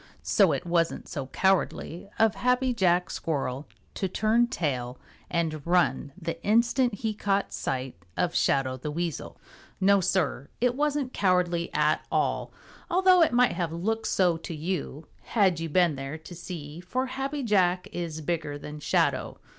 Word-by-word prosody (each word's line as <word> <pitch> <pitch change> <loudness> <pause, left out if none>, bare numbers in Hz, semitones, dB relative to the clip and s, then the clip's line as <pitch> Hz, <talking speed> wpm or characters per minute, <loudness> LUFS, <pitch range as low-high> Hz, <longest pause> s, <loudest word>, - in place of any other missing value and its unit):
So 195 -5 +4
it 140 +5 -2
wasn't 170 -1 0
so 140 -5 -5
cowardly 190 +1 0
of 225 -1 +4
Happy 250 +1 +1
Jack 180 -5 +2
Squirrel 140 -3 -3 0.3
to 190 - -2
turn 220 +5 +2
tail 130 - -2 0.3
and 160 -3 -1
run 175 -5 +2
the 165 -2 -5
instant 235 +2 +3
he 220 +1 -2
caught 200 -1 -1
sight 130 -1 -3 0.2
of 175 -1 +1
Shadow 130 -2 +1
the 140 +4 -5
Weasel. 165 0 -4 0.4
No, 200 +1 +4
Sir, 165 -7 0
it 245 0 +2
wasn't 285 -1 -1
cowardly 180 -3 +1
at 150 +1 +2
all, - - 0 0.4
although 370 0 +5
it 325 - +5
might 245 +1 +4
have 170 -3 -2
looked 220 +7 -2
so 180 -3 +2
to 165 0 -7
you 160 -2 -4 0.2
had 190 -7 +2
you 165 0 -3
been 170 -1 +3
there 135 +3 -5
to 160 +3 -12
see, 165 -3 -7
for 250 +9 -2
Happy 270 +2 -3
Jack 185 -5 +2
is 165 -3 -4
bigger 155 -2 -2
than 150 +1 -8
Shadow. - - 0
175 Hz, 155 wpm, -27 LUFS, 155-220 Hz, 0.4 s, although